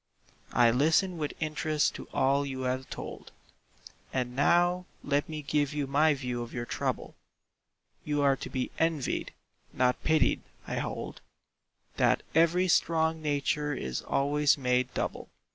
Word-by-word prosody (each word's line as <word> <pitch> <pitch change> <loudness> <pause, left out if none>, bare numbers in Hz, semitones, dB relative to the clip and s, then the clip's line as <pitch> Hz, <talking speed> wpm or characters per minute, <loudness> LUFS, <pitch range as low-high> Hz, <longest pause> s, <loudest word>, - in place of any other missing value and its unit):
I 120 -1 +5
listen 165 +8 +2
with 150 -2 -2
interest 155 -1 0
to - - -8
all 140 +2 +2
you 135 -2 -4
have 130 +1 -2
told, - - -8 0.8
And 125 -1 -2
now 175 +5 +3 0.2
let 145 +1 0
me 155 -1 -5
give 145 0 0
you 145 -1 0
my 145 +3 +3
view 125 -3 -3
of 120 +1 -7
your 120 -1 -3
trouble: - - -3 0.9
You 145 -1 0
are 140 -1 +4
to - - -7
be 130 -1 -3
envied, 160 -5 0 0.4
not 125 0 +1
pitied; 160 0 +2 0.2
I - - -4
hold - - -4 0.8
That - - +3
every 170 +3 +4
strong 160 -2 +2
nature 150 0 0
is 65 - -3
always 145 +1 +2
made 125 -1 +1
double. - - -3
145 Hz, 145 wpm, -29 LUFS, 130-155 Hz, 0.9 s, I